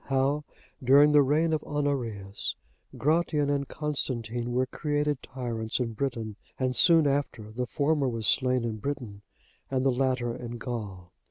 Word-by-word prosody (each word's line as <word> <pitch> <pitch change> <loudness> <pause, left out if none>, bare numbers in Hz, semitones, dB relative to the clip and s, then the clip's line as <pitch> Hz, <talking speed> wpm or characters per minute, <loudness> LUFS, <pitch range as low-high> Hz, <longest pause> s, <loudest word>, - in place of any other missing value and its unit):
How 135 +2 +1 0.4
during 140 +4 +7
the 150 -1 +7
reign 155 +4 +2
of 155 - 0
Honorius, 120 -10 -2 0.4
Gratian 150 -1 +2
and 140 -1 0
Constantine 120 -5 -3
were 125 +1 +2
created 145 0 -1
tyrants 115 -4 -3
in 115 -2 -1
Britain; 110 -4 -3 0.2
and 130 -1 0
soon 165 -3 +6
after 135 -6 -1
the 125 +3 -3
former 145 +1 +1
was 115 -2 -3
slain 125 +1 +2
in 110 -2 -3
Britain, 110 -4 -5 0.5
and 130 0 0
the 135 - +5
latter 125 -2 0
in 120 -1 -6
Gaul. 100 -7 -6
130 Hz, 150 wpm, -28 LUFS, 115-145 Hz, 0.5 s, during